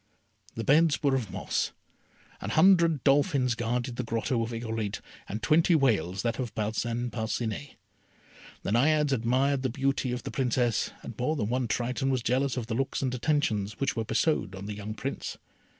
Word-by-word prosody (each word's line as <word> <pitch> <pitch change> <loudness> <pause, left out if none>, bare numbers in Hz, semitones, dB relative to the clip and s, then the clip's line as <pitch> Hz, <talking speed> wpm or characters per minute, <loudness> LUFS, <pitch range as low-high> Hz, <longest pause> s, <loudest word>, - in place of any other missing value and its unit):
The 115 - -3
beds 155 +3 +4
were 140 -2 +3
of 125 -7 -1
moss. 95 0 -2 0.7
An 100 - -4
hundred 165 - +5
dolphins 135 -3 +3
guarded 120 +1 -2
the 125 - -1
grotto 115 +2 -1
of 115 - -2
Irolite, 115 -3 -3 0.3
and 105 +2 -4
twenty 165 +2 +4
whales 105 - +1
that 115 0 -1
of 125 -4 -4
Parcin 115 +3 -2
Parcinet. 110 +3 -3 0.9
The - - -2
Naiades 150 +5 +3
admired 130 +3 +1
the 130 - 0
beauty 135 0 0
of 125 0 -3
the - - -5
Princess, 125 -3 +1
and - - -7
more 150 +6 +1
than 110 -7 -1
one 125 0 0
Triton 125 +4 -1
was 130 -3 0
jealous 130 +2 +1
of 120 - -2
the 115 - -4
looks 135 +3 -1
and 130 -2 0
attentions 115 -7 0
which 135 -1 0
were 115 - -1
bestowed 110 - 0
on 95 +1 -7
the 105 - -4
young 105 +1 -6
Prince. 135 +4 -4
125 Hz, 180 wpm, -28 LUFS, 115-140 Hz, 0.9 s, hundred